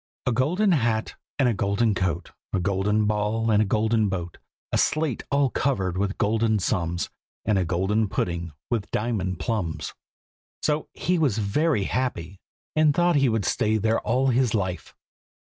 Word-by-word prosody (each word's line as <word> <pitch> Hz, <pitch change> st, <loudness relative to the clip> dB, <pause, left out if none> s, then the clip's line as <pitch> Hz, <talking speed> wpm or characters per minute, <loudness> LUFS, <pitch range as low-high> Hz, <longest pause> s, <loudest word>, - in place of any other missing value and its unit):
A -, -, +2 dB
golden 170 Hz, -, +2 dB
hat 115 Hz, -8 st, +1 dB, 0.2 s
and 135 Hz, -, +3 dB
a 120 Hz, -, +2 dB
golden 100 Hz, +3 st, +1 dB
coat, 90 Hz, -2 st, -2 dB, 0.2 s
A 95 Hz, -, +2 dB
golden 100 Hz, +3 st, +1 dB
ball 105 Hz, +2 st, 0 dB
and 105 Hz, 0 st, +4 dB
a -, -, +2 dB
golden 110 Hz, +1 st, +2 dB
boat, 90 Hz, -3 st, -4 dB, 0.3 s
A -, -, +2 dB
slate 155 Hz, -6 st, 0 dB
all 140 Hz, -2 st, +2 dB
covered 95 Hz, -10 st, 0 dB
with 100 Hz, +1 st, -1 dB
golden 110 Hz, +1 st, +2 dB
sums, 85 Hz, -2 st, -1 dB, 0.3 s
And 105 Hz, -2 st, +2 dB
a 90 Hz, -, +1 dB
golden 95 Hz, +5 st, +1 dB
pudding 85 Hz, -3 st, -2 dB, 0.2 s
with 110 Hz, -4 st, -1 dB
diamond 105 Hz, -5 st, -1 dB
plums. 105 Hz, -9 st, -2 dB, 0.7 s
So 150 Hz, 0 st, 0 dB
he 180 Hz, -1 st, 0 dB
was 135 Hz, -9 st, +2 dB
very 110 Hz, +4 st, +1 dB
happy, 95 Hz, -6 st, -2 dB, 0.4 s
and 155 Hz, -2 st, +4 dB
thought 175 Hz, 0 st, +3 dB
he 135 Hz, -2 st, +3 dB
would 110 Hz, -4 st, 0 dB
stay 110 Hz, +1 st, +1 dB
there 110 Hz, +2 st, +1 dB
all 130 Hz, +4 st, +1 dB
his 125 Hz, -2 st, +2 dB
life. 95 Hz, -3 st, -3 dB
110 Hz, 165 wpm, -25 LUFS, 95-125 Hz, 0.7 s, and